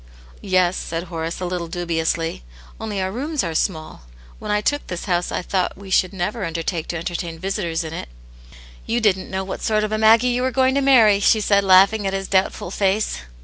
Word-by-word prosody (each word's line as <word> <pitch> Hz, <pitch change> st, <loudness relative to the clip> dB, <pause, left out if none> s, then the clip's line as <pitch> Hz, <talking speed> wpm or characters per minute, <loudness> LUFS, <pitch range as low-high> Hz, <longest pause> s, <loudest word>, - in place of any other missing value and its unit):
"Yes," 185 Hz, -2 st, +2 dB
said 165 Hz, +1 st, -4 dB
Horace, 165 Hz, -2 st, -5 dB
a -, -, -2 dB
little 175 Hz, -1 st, -3 dB
dubiously. 165 Hz, -, -2 dB, 0.4 s
'*Only 215 Hz, -3 st, -4 dB
our 190 Hz, 0 st, -1 dB
rooms 285 Hz, +6 st, -2 dB
arc 165 Hz, -3 st, -3 dB
so -, -, +3 dB
small. 160 Hz, -5 st, -11 dB, 0.4 s
When -, -, -7 dB
I 210 Hz, 0 st, +2 dB
took 290 Hz, +7 st, -1 dB
this 180 Hz, -, -5 dB
house, 175 Hz, -2 st, 0 dB
I -, -, -2 dB
tlpught 185 Hz, 0 st, -1 dB
we 195 Hz, -1 st, -11 dB
should 185 Hz, 0 st, +3 dB
never 200 Hz, +3 st, -3 dB
undertake 165 Hz, 0 st, -3 dB
to 170 Hz, -, -3 dB
entertain 170 Hz, 0 st, -4 dB
visitors 175 Hz, -3 st, -2 dB
in 160 Hz, 0 st, -6 dB
it." 115 Hz, -, -6 dB, 0.4 s
*' -, -, -20 dB
You 235 Hz, -, +1 dB
didn't 200 Hz, -4 st, +1 dB
know 190 Hz, 0 st, -2 dB
what 190 Hz, -, -6 dB
sort 215 Hz, -1 st, +1 dB
of 215 Hz, -, -2 dB
a 215 Hz, -, -1 dB
Maggie 225 Hz, +3 st, +5 dB
you 245 Hz, 0 st, 0 dB
were 260 Hz, -, +1 dB
going 260 Hz, +1 st, +2 dB
to 280 Hz, -, +1 dB
marry," 230 Hz, -7 st, +5 dB
she 215 Hz, +2 st, +4 dB
said, 200 Hz, -1 st, +2 dB
laughing 195 Hz, +2 st, +5 dB
at 195 Hz, -, -2 dB
his 195 Hz, 0 st, -3 dB
doubtful 190 Hz, -2 st, 0 dB
face. 200 Hz, +2 st, 0 dB
190 Hz, 220 wpm, -21 LUFS, 170-215 Hz, 0.4 s, Maggie